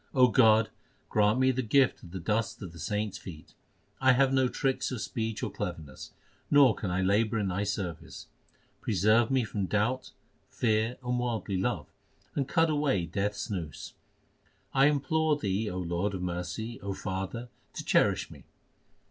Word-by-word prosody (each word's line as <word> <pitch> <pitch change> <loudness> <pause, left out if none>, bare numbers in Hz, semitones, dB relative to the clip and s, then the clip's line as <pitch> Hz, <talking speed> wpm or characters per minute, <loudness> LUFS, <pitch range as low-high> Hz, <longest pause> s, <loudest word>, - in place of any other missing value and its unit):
God, 110 -3 +5 0.4
grant 105 +2 +3
me 130 0 +4
the 130 0 -1
gift 130 +3 +3
of 85 - -12
the 95 +2 -6
dust 105 +5 -1
of 90 - -7
the 85 - -12
saints 105 +5 -2
feet. 80 -4 -11 0.5
1 130 -1 +5
have 135 +1 +3
no 130 -1 +3
tricks 135 +1 -1
of 125 - -3
speech 110 0 -3
or - - -2
cleverness, 70 -4 -6 0.4
nor 140 -5 +6
can 100 - -4
I 90 +1 0
labour 105 +4 +2
in 100 -3 0
Thy 95 +3 -1
service. 90 -5 -4 0.6
Preserve 110 +3 +3
me 130 -2 +2
from 100 -3 -3
doubt, 110 +6 0 0.4
fear, 110 +1 0
and 125 0 -1
worldly 115 -5 -2
love, - - -1 0.5
and 140 -3 -1
cut 160 +3 +3
away 145 - +1
Death 100 +4 -1
s 110 - -5
noose. 85 -6 -5 0.8
I 135 +1 +5
implore 150 +1 +1
Thee, 105 -3 -1
O 90 - -5
Lord 90 +3 -1
of 90 - -4
mercy, 90 +6 -4
O 100 0 -3
Father, 95 +6 -4 0.2
to - - -6
cherish - - +2
me - - -13
110 Hz, 165 wpm, -29 LUFS, 95-125 Hz, 0.8 s, nor